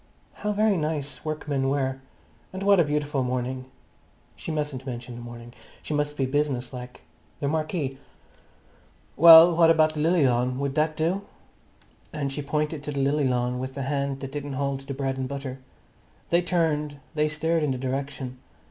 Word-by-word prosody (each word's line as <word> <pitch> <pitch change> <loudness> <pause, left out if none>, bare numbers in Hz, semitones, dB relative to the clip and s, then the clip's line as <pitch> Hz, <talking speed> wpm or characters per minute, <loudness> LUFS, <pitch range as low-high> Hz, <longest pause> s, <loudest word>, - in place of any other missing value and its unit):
How 210 - 0
very 210 -1 +2
nice 150 -2 -3
workmen 150 -3 -1
were! 135 -1 -1 0.5
And 190 +1 -5
what 200 -1 +5
a - - +6
beautiful 150 -2 -1
morning! 130 0 -2 0.7
She - - -8
mustn't 145 -4 -3
mention 125 -1 -6
the 120 - -8
morning; 120 0 -10 0.3
she - - -4
must 145 0 -1
be 135 - +1
business 130 -2 -1
like. 125 0 -8 0.4
The 140 - -1
marquee. 155 -3 -2 1.2
"Well, 165 +1 +10
what 165 -1 +5
about 155 -1 +4
the 155 - -5
lily 165 0 +3
lawn? 125 0 +1
Would 140 0 -2
that 155 +1 0
do?" 170 +5 0 0.9
And 140 -3 -3
she 145 - -3
pointed 150 +1 -2
to 150 - -3
the 140 - -3
lily 140 +1 +2
lawn 125 0 0
with 130 +1 -5
the 140 - -3
hand 140 0 -2
that 135 -1 -6
didn't 145 -1 -5
hold 140 0 -1
the 140 - -4
bread 135 -1 -2
and 130 - -2
butter. 135 -2 -5 0.7
They 170 +1 +4
turned, 155 -5 0 0.2
they 150 -1 +2
stared 160 +2 0
in 150 - +1
the 130 - -1
direction. 130 0 -4
145 Hz, 175 wpm, -26 LUFS, 130-155 Hz, 1.2 s, Well